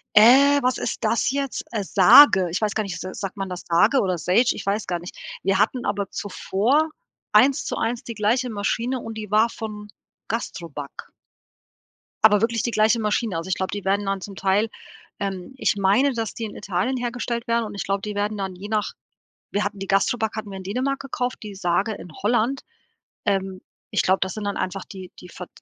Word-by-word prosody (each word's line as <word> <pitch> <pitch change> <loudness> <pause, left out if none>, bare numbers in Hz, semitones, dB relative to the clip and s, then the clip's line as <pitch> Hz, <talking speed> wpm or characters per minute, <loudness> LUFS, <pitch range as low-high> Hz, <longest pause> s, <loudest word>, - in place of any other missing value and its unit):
Äh, 275 +6 +7
was 255 0 +2
ist - - -4
das 230 - +2
jetzt? 275 -1 -2
Äh, 215 -3 -2
Sage, 190 - +7
ich 180 - -2
weiß 215 -1 0
gar 215 - 0
nicht, 195 -3 -5
s 185 - -7
sagt 195 0 -5
man 195 -1 -3
das 180 0 -5
Sage 175 +11 +4
oder 185 -3 0
Sage 180 +5 +2
ich 200 - -6
weiß 205 +2 -1
gar 175 -1 -1
nicht. 175 - -10 0.3
Wir 195 +1 +2
hatten 240 +4 +1
aber 200 -1 -2
zuvor 225 +10 0 0.4
eins 270 +1 +5
zu - - -3
eins 235 +1 -2
die 230 - -6
gleiche 235 +4 +1
Maschine 230 +4 -1
und 225 -1 -7
die 215 -2 -6
war 220 +2 +4
von 210 -2 -7 0.4
GASTROBACK. 170 -10 -6 1.1
Aber 210 -2 +6
wirklich 230 -1 +1
die 235 - -1
gleiche 220 +2 +3
Maschine. 210 -3 0
Also, 165 - -5
ich 185 - +1
glaube, 190 0 -3
die 205 -2 -5
werden 200 +1 +1
dann 195 -1 -2
zum 200 0 -8
Teil 195 +4 +1 0.5
ähm, 195 +3 -4
ich - - +1
meine, 205 +9 +3
dass 225 -2 -3
die 230 - -5
in 215 - -8
Italien 195 +6 -1
hergestellt 240 0 -3
werden 230 -1 +1
und 210 - -7
ich 200 - -3
glaube, 195 0 -1
die 210 - -4
werden 205 +1 -1
dann 190 -2 -4
je 195 +3 -8
nach 215 -1 0 0.6
wir 205 - 0
hatten 205 0 -4
die 195 - -5
GASTROBACK 220 +3 +1
hatten 215 -2 -5
wir 195 - -6
in 190 - -8
Dänemark 255 +8 -1
gekauft, 250 -2 -3
die 205 -2 -8
Sage 190 +3 0
in 180 - -10
Holland. 240 +5 +1 0.6
Ähm, 195 -2 -1 0.3
ich - - +2
glaube, 190 +1 +3
das 190 0 -1
sind 215 - -5
dann 200 - -2
einfach 185 +1 -3
die 185 -2 -10
die 180 - -12
Ver 180 0 -9
210 Hz, 210 wpm, -23 LUFS, 190-230 Hz, 1.1 s, Äh